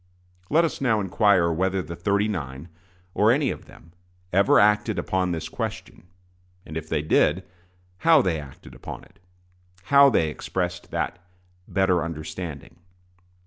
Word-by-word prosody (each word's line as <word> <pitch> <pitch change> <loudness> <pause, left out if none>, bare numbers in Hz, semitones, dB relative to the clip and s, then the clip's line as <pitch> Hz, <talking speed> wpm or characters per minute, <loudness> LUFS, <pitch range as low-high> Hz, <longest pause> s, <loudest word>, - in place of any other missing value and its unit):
Let 165 +3 +4
us 160 - -4
now 115 -5 +2
inquire 95 -3 +2
whether 95 +2 0
the 85 - -7
"thirty 100 +3 0
nine," 75 -5 -5 0.4
or 105 +2 +4
any 140 +1 +1
of - - -8
them, 85 - -18 0.4
ever 100 +1 +5
acted 105 +1 +3
upon 95 -1 -1
this 80 -2 -4
question; 90 - -6 0.6
and 80 - -9
if 80 -1 -5
they 75 -2 -1
did, 75 - +2 0.5
how 160 - +5
they 85 -4 0
acted 70 -3 -12
upon - - -9
it - - -22 0.6
how 140 +6 +6
they 80 - +1
expressed 90 +2 -4
that - - -3 0.5
better 95 -2 +1
understanding. 80 -1 -7
95 Hz, 145 wpm, -24 LUFS, 80-105 Hz, 0.6 s, how